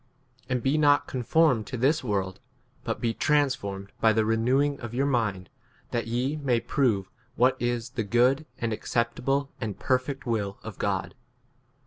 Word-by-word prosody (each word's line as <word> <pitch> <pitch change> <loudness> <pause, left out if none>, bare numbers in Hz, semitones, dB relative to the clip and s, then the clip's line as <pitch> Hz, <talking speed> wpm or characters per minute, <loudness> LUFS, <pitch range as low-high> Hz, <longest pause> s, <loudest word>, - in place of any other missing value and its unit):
And 125 -2 -1
be 140 +3 +2
not 145 -1 +4
conformed 130 -2 +2
to 125 - -4
this 145 +5 +2
world, 95 -5 -2 0.4
but - - -3
be 115 -1 0
transformed 130 -10 0
by 110 -1 +5
the 110 0 +2
renewing 130 +6 +2
of 120 -1 -7
yourP 135 +3 +1
mind, 100 -8 -1 0.4
that 120 -1 -1
ye 125 +6 -1
may 130 -5 +1
prove 115 -9 0
* 125 - -38
what 125 +2 +4
[is] 120 0 -1
the 125 -3 -2
good 125 +8 +2
and 115 -3 -1
acceptable 125 +5 -1
and 105 -4 -3
perfect 130 +1 -1
will 105 -4 -1
of 110 - -6
3 - - -25
God. 95 -2 -1
120 Hz, 165 wpm, -27 LUFS, 110-135 Hz, 0.4 s, by